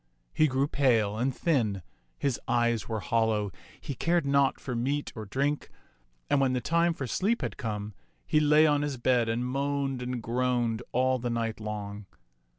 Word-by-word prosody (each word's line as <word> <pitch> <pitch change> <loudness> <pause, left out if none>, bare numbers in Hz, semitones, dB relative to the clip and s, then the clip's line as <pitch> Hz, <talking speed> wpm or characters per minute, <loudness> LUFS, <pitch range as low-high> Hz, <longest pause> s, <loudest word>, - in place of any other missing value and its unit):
He 155 - +4
grew 135 +1 +1
pale 115 -8 +2
and 125 +5 0
thin, 115 - 0 0.3
his 135 -4 -1
eyes 120 -2 +1
were 110 -2 -2
hollow, 110 -4 +1 0.3
he 140 - -5
cared 170 +4 +1
naught 140 -1 +2
for 125 - -5
meat 140 +5 -1
or 110 -2 -6
drink, 140 +7 -1 0.6
and 145 - +2
when 130 -1 +2
the 125 - +1
time 170 +4 +1
for 135 - -4
sleep 205 - 0
had - - -3
come, 105 -4 -4 0.3
he 155 - +3
lay 150 +1 +5
on 145 -2 +3
his 145 -3 -2
bed 120 -1 +2
and 115 +2 -1
moaned 135 0 -1
and 125 -2 -4
groaned 120 -1 0
all 130 +1 +2
the 120 0 -2
night 115 -1 -2
long. 105 -2 -6
125 Hz, 175 wpm, -28 LUFS, 115-140 Hz, 0.6 s, lay